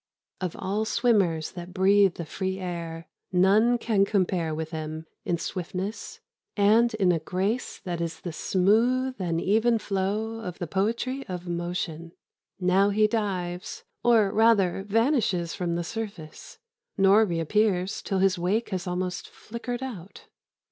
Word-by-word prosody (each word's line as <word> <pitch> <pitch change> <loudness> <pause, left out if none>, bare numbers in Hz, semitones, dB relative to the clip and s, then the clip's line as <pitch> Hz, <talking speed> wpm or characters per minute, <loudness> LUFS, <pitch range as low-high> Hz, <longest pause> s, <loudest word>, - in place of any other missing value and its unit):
Of 180 -3 -3
all 200 +3 -1
swimmers 205 -9 +1
that 180 +1 -9
breathe 195 -1 +4
the 170 - -5
free 190 +4 -3
air 170 -3 -5 0.2
none 205 +6 +4
can 215 -4 +2
compare 185 -5 0
with 160 +1 -4
him 155 0 -5 0.2
in 170 - 0
swiftness 185 +4 -5 0.4
and 220 +4 +4
in 190 -4 +3
a 165 - +1
grace 190 +9 -2
that 175 -3 -3
is 165 -1 -3
the 175 - -5
smooth 230 +10 +2
and 170 -3 -1
even 220 +6 +3
flow 210 +3 -2
of 180 -6 -6
the 175 - -3
poetry 230 - -1
of 180 -2 -6
motion. 170 -1 -4 0.5
Now 190 +2 +3
he 215 +1 +3
dives, 185 -5 -2 0.2
or 225 -5 +4
rather 205 -5 +3
vanishes 215 - +1
from 175 -3 -2
the 170 - -1
surface, 200 -4 -7 0.4
nor 195 +2 +6
reappears 185 +1 0
till 195 - -2
his 190 -1 +2
wake 200 +7 0
has 190 -2 -3
almost 180 0 -3
flickered 240 +2 -6
out. 205 -8 -8
190 Hz, 140 wpm, -26 LUFS, 175-215 Hz, 0.5 s, nor